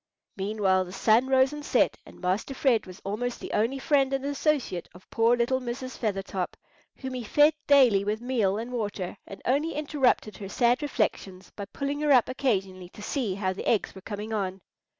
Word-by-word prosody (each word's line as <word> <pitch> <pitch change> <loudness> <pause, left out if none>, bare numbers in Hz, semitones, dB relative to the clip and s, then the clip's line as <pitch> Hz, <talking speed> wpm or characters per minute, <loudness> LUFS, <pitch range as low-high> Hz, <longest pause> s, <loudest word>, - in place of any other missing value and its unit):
Meanwhile 195 -2 +1
the 180 - -10
sun 225 +5 +3
rose 265 +1 +3
and 295 0 -6
set, - - +2
and - - -14
Master 190 +9 -1
Fred 250 -6 +2
was 185 +2 -11
almost 235 +5 -3
the - - -7
only 230 +6 +1
friend 275 -1 +2
and 270 0 -1
associate 280 - -1
of 180 - -16
poor 230 +1 +3
little 240 +2 +1
Mrs. 255 +1 -5
Feathertop, 195 -4 -3 0.4
whom 260 -1 -6
he 250 -1 -4
fed 295 +7 +4
daily 255 -9 +6
with 210 +2 -1
meal 230 -6 0
and 235 +3 -5
water, 205 -5 -3
and 195 - -10
only 290 +6 +1
interrupted 285 -7 +1
her 195 -2 -7
sad 240 +4 +2
reflections 195 -9 -2
by 200 - -5
pulling 280 +7 -4
her 300 -1 +2
up 250 -4 +5
occasionally 195 -9 -1
to 210 - -12
see 225 -6 -2
how 190 -1 -1
the 185 - -6
eggs 220 - +1
were 190 - -11
coming 210 +2 -6
on. 190 -2 -2
230 Hz, 190 wpm, -27 LUFS, 195-265 Hz, 0.4 s, daily